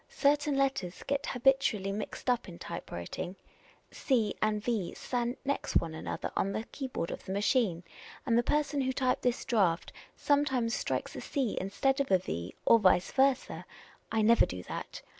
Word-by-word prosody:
Certain 290 0 +2
letters 265 -10 -1
get 280 0 -1
habitually 245 -6 +2
mixed 210 +5 -5
up 245 -5 +1
in 170 - -10
typewriting; 170 - -6 0.6
c 230 -7 +1
and 215 -1 +1
v 220 -6 -1
stand 245 0 -2
next 280 +1 -2
one 165 -1 -2
another 160 - -4
on 195 - 0
the 220 - -2
keyboard 260 -11 -4
of - - -6
the - - -5
machine, 200 - +1 0.4
and 235 -4 +2
the 235 - +5
per.son 290 +2 0
who 260 0 0
typed 255 -1 +1
this 245 -1 0
draft 190 -8 +1 0.2
sometimes 265 -5 +1
strikes - - -2
a - - -5
c 265 -7 -1
instead 265 +8 0
of 280 - 0
a 190 - +6
v, 85 - -5
or 230 - +7
2'?V<? 185 -3 +4
versa. 265 -1 +2 0.5
I 220 -1 +2
never 230 +1 +5
do 90 0 -6
that. - - -7
235 Hz, 170 wpm, -31 LUFS, 190-270 Hz, 0.6 s, or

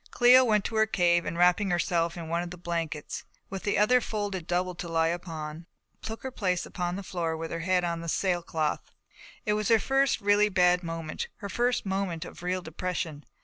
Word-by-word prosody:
Cléo 250 +1 +7
went 215 -4 +2
to 225 - -3
her 220 0 +4
cave 175 -4 +2
and 170 - -3
wrapping 180 +3 +4
herself 170 -1 0
in 165 -2 -6
one 170 +1 0
of 175 - -5
the 180 - -9
blankets, 170 -3 -4 0.3
with 195 -1 -4
the 205 - 0
other 245 +5 +4
folded 205 -6 -3
double 180 +1 0
to 175 - -6
lie 165 -1 +2
upon, 165 -2 -5 0.3
took 225 0 -6
her 265 - -4
place 185 -7 -1
upon 175 -1 -3
the 200 - -5
floor 170 -3 -2
with 165 0 -5
her 165 - -3
head 180 +1 +1
on 170 -1 -2
the 170 - -4
sailcloth. 170 -4 -1 0.5
It 210 - +2
was 210 -1 0
her 225 - +6
first 270 +4 +2
really 205 +1 +4
bad 180 -2 +4
moment. 165 -2 -4
Her 200 - -7
first 240 +2 0
moment 190 -3 -2
of - - -11
real 180 +1 -2
depression. 160 -3 -4
180 Hz, 205 wpm, -28 LUFS, 170-205 Hz, 0.5 s, Cléo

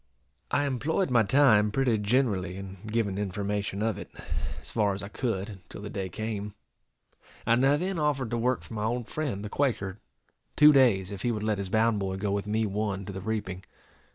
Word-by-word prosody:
I 145 - +2
employed 145 +5 0
my 120 -2 +5
time 110 -2 +5
pretty 120 -1 +1
generally 100 -5 +1
in 95 0 -8
giving 105 -3 0
information 100 0 -2
of 110 -4 0
it, - - -8 0.5
as - - -7
far 105 -3 +1
as 100 - -6
I 100 - -6
could, 105 -4 -2
until 95 +1 -11
the 105 - -6
day 95 -2 -3
came; 105 +1 -4 0.9
and 115 +3 +3
I 140 +2 +5
then 185 +2 -2
offered 140 -6 0
to 120 - 0
work 125 +2 +1
for - - -11
my 105 -1 -2
old 120 +1 -1
friend, 125 -10 -3
the - - -3
Quaker, 105 -7 -1 0.6
two 150 0 +8
days, 110 -9 +4
if 100 -2 -6
he 120 - +1
would 105 -2 -3
let 105 -2 0
his 100 -2 -3
bound 110 +1 +2
boy 95 -1 -2
go 100 +1 -1
with 100 +1 -1
me 110 +1 +1
one 100 -1 -2
to 100 - -6
the 95 - -5
reaping. 95 -3 -3
105 Hz, 205 wpm, -28 LUFS, 100-125 Hz, 0.9 s, two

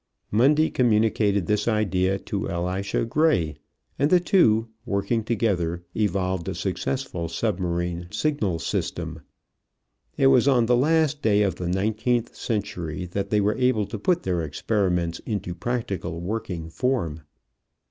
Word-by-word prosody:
Mundy 145 +8 +4
communicated 105 -5 +2
this 105 +2 0
idea 95 -4 +1
to 100 0 -4
Elisha 95 +4 -1
Gray, 115 - +1 0.4
and 145 +2 +3
the 180 - +6
two, 115 - +3 0.2
working 110 +1 -1
together, 95 -7 0
evolved 95 -4 0
a - - -4
successful 95 0 -3
submarine 85 -2 -2
signal 110 - 0
system. - - -3 1.0
It - - +3
was 135 -1 +5
on 125 -4 +4
the 120 +2 +3
last 155 +2 +2
day 105 -5 +3
of 100 - +1
the 90 - -3
nineteenth 110 +5 0
century 90 -6 -3
that 100 +1 -2
they 105 0 +2
were 105 +1 +1
able 125 -5 +2
to 105 - -6
put 175 - +1
their 90 -2 0
experiments 85 +1 -1
into 100 -5 -3
practical 95 -3 -3
working 90 -4 -4
form. 85 - -1
105 Hz, 135 wpm, -25 LUFS, 90-120 Hz, 1.0 s, the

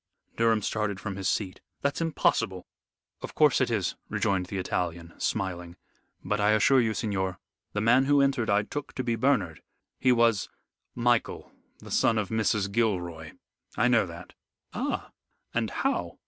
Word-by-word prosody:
Durham 115 -2 +2
started 105 -3 -1
from 100 -1 -5
his 95 0 -1
seat. 95 -4 -2 0.2
"That's 140 +3 0
impossible." 165 -1 0 0.6
"Of - - -8
course - - +4
it - - +2
is," - - 0 0.2
rejoined 95 -2 0
the 100 - -4
Italian, 85 -2 -3
smiling; 90 -4 -2 0.5
"but 105 - 0
I 105 +1 +4
assure 125 +5 +5
you, 110 -2 0
signor, 95 -4 -2 0.4
the 105 - -1
man 125 +5 +4
who 145 +1 +4
entered 135 -4 +2
I 105 +1 +3
took 145 +7 -6
to 130 - -3
be 120 -1 0
Bernard. 115 - +1 0.4
He 130 - +4
was 115 -4 +3 0.2
" - - -54 0.2
"Michael, 120 - -1 0.3
the - - -12
son 115 - +3
of 105 -3 -1
Mrs. 110 -3 0
Gilroy. 90 -8 -1 0.4
I 120 - +3
know 115 -5 +3
that." 85 +1 -10 0.4
"Ah! - - -3 0.4
And - - 0
how?" - - -2
105 Hz, 160 wpm, -27 LUFS, 95-115 Hz, 0.6 s, assure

